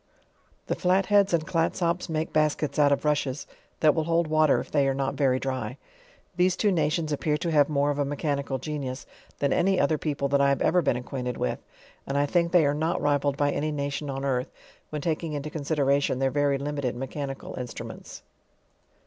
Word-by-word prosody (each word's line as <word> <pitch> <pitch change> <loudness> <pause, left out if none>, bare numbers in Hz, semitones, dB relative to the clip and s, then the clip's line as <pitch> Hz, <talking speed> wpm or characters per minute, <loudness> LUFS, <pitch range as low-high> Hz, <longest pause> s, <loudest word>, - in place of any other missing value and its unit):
The - - -1
Flatheada 195 +2 +3
and 160 -2 -2
Clatsops 170 +1 0
make 160 0 -2
baskets 150 -1 +1
out 145 -1 +5
of 140 - +1
rushes, 145 -2 0 0.4
that 155 -2 +5
will 160 -2 -1
hold 170 +1 +2
water 155 -1 +3
if - - -7
they 140 -2 +3
are 135 - +1
not 135 0 -1
very 130 -3 +2
dry. 130 -1 -3 0.6
These 180 0 +3
two 210 - +2
nations 155 -2 0
appear 150 +1 0
to 170 +2 -2
have 145 -2 +4
more 145 -1 +1
of 145 - -3
a - - +3
mechanical 140 -1 -2
genius, 140 -2 -5 0.3
than 140 - +1
any 190 0 +2
other 150 +1 +2
people 140 -2 -1
that 140 0 +3
I 140 - +4
have 140 - +1
ever 180 +1 +3
been 140 - +1
acquainted 125 -1 -4
with. 60 - -2 0.5
And 140 - -1
I 145 - +3
think 170 +2 +1
they 170 -3 +5
are 145 - +2
not 160 +3 0
rivalled 145 -1 +1
by 145 0 +2
any 155 +2 -1
nation 140 0 -3
on 135 0 -3
earth, 130 -2 0 0.4
when 150 -2 -5
taking 160 -1 -2
into 145 +1 -4
consideration 140 -3 +1
their 135 0 +1
very 145 -1 +2
limited 140 -3 -3
mechanical 135 +2 -5
in 125 - -5
strumsnts. - - -9
145 Hz, 200 wpm, -26 LUFS, 140-155 Hz, 0.6 s, out